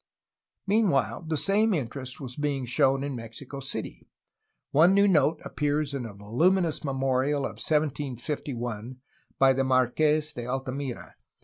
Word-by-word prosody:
Meanwhile 195 Hz, -7 st, +1 dB
the 160 Hz, -1 st, 0 dB
same 205 Hz, +4 st, +2 dB
interest 130 Hz, -2 st, -4 dB
was 125 Hz, -4 st, -7 dB
being 145 Hz, -3 st, -1 dB
shown 135 Hz, +2 st, +2 dB
in 140 Hz, -2 st, -3 dB
Mexico 120 Hz, +4 st, -8 dB
City. 135 Hz, -, -5 dB, 0.6 s
One 170 Hz, +6 st, +5 dB
new 200 Hz, 0 st, +5 dB
note 155 Hz, -3 st, +3 dB
appears 145 Hz, 0 st, -1 dB
in 130 Hz, -4 st, -3 dB
a 105 Hz, -, -10 dB
voluminous 160 Hz, -, +1 dB
memorial 135 Hz, 0 st, 0 dB
of -, -, -6 dB
1751 130 Hz, -5 st, -2 dB, 0.4 s
by 135 Hz, 0 st, +5 dB
the 135 Hz, +1 st, +1 dB
Marques 150 Hz, +4 st, +2 dB
de 120 Hz, -, -5 dB
Altamira. 130 Hz, 0 st, -4 dB
140 Hz, 130 wpm, -27 LUFS, 130-155 Hz, 0.6 s, One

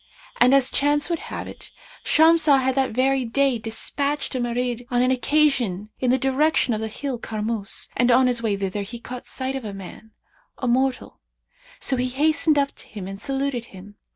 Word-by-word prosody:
And 245 Hz, +1 st, +5 dB
as 270 Hz, -2 st, +3 dB
chance 290 Hz, +3 st, +1 dB
would 335 Hz, -, 0 dB
have -, -, -5 dB
it, -, -, -11 dB, 0.3 s
Shamsah 320 Hz, -2 st, +5 dB
had 260 Hz, 0 st, +1 dB
that 265 Hz, 0 st, +1 dB
very 260 Hz, +3 st, +1 dB
day 255 Hz, +1 st, +1 dB
despatched 280 Hz, +7 st, -2 dB
a 255 Hz, -, -2 dB
Marid 245 Hz, 0 st, -2 dB
on 245 Hz, 0 st, +2 dB
an 255 Hz, -, +2 dB
occasion 255 Hz, -8 st, +1 dB
in 255 Hz, -, +1 dB
the 255 Hz, -, +4 dB
direction 270 Hz, 0 st, +2 dB
of 215 Hz, -, -2 dB
the 220 Hz, -, -2 dB
hill 250 Hz, +3 st, -5 dB
Karmus, 215 Hz, -2 st, -4 dB
and 245 Hz, -1 st, +2 dB
on 255 Hz, +2 st, +5 dB
his 245 Hz, -2 st, +2 dB
way 210 Hz, -3 st, 0 dB
thither 195 Hz, +1 st, -3 dB
he 220 Hz, +4 st, -7 dB
caught 250 Hz, +1 st, -9 dB
sight 260 Hz, +1 st, -3 dB
of 265 Hz, -, -4 dB
a 205 Hz, -2 st, -6 dB
man, 195 Hz, +3 st, -10 dB, 0.5 s
a 255 Hz, -, -3 dB
mortal; 260 Hz, +1 st, 0 dB, 0.6 s
so 265 Hz, -, 0 dB
he 250 Hz, +1 st, 0 dB
hastened 300 Hz, +3 st, +2 dB
up 280 Hz, 0 st, +2 dB
to -, -, -10 dB
him 200 Hz, -4 st, -8 dB
and 195 Hz, +1 st, -8 dB
saluted 270 Hz, -2 st, -2 dB
him. 200 Hz, -1 st, -13 dB
250 Hz, 195 wpm, -23 LUFS, 225-275 Hz, 0.6 s, And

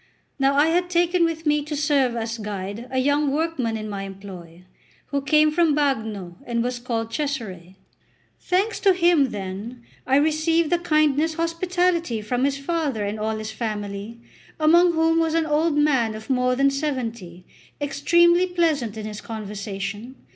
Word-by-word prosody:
Now 275 Hz, +1 st, +3 dB
I 295 Hz, +3 st, +4 dB
had 355 Hz, +2 st, +1 dB
taken 350 Hz, 0 st, +2 dB
with 325 Hz, 0 st, -3 dB
me 300 Hz, 0 st, +2 dB
to 300 Hz, +1 st, -5 dB
serve 280 Hz, -4 st, +1 dB
as 230 Hz, 0 st, -3 dB
guide 205 Hz, +2 st, -5 dB
a 260 Hz, -, -3 dB
young 285 Hz, +2 st, +2 dB
workman 280 Hz, -7 st, -1 dB
in 215 Hz, 0 st, -6 dB
my 200 Hz, -2 st, -5 dB
employ, 190 Hz, -3 st, -10 dB, 0.5 s
who 280 Hz, -1 st, -1 dB
came 305 Hz, +2 st, +4 dB
from 325 Hz, -2 st, +2 dB
Bagno, 220 Hz, -11 st, -2 dB
and 235 Hz, -1 st, -1 dB
was 245 Hz, 0 st, -3 dB
called 230 Hz, -2 st, -3 dB
Cesare. 215 Hz, -, -4 dB, 0.6 s
Thanks 390 Hz, +5 st, 0 dB
to 390 Hz, -2 st, +4 dB
him, 340 Hz, -6 st, +3 dB
then, 205 Hz, +4 st, -6 dB, 0.2 s
I 265 Hz, -, +3 dB
received 315 Hz, +2 st, +2 dB
the 350 Hz, -, +3 dB
kindest 310 Hz, -1 st, +2 dB
hospitality 335 Hz, -4 st, 0 dB
from 245 Hz, +5 st, -1 dB
his 280 Hz, 0 st, 0 dB
father 275 Hz, -7 st, -2 dB
and 210 Hz, +2 st, -4 dB
all 220 Hz, +1 st, -2 dB
his 215 Hz, 0 st, -5 dB
family, 210 Hz, 0 st, -5 dB, 0.4 s
among 340 Hz, +3 st, +5 dB
whom 325 Hz, 0 st, +2 dB
was 325 Hz, -1 st, +1 dB
an 330 Hz, -1 st, +2 dB
old 305 Hz, 0 st, +1 dB
man 265 Hz, -7 st, +2 dB
of 220 Hz, +5 st, -6 dB
more 250 Hz, 0 st, +2 dB
than 275 Hz, +1 st, +3 dB
seventy, 235 Hz, -, -4 dB, 0.3 s
extremely 345 Hz, +5 st, +3 dB
pleasant 310 Hz, -, 0 dB
in 215 Hz, -, -5 dB
his 210 Hz, -1 st, -6 dB
conversation. 210 Hz, +2 st, -6 dB
275 Hz, 160 wpm, -23 LUFS, 220-320 Hz, 0.6 s, among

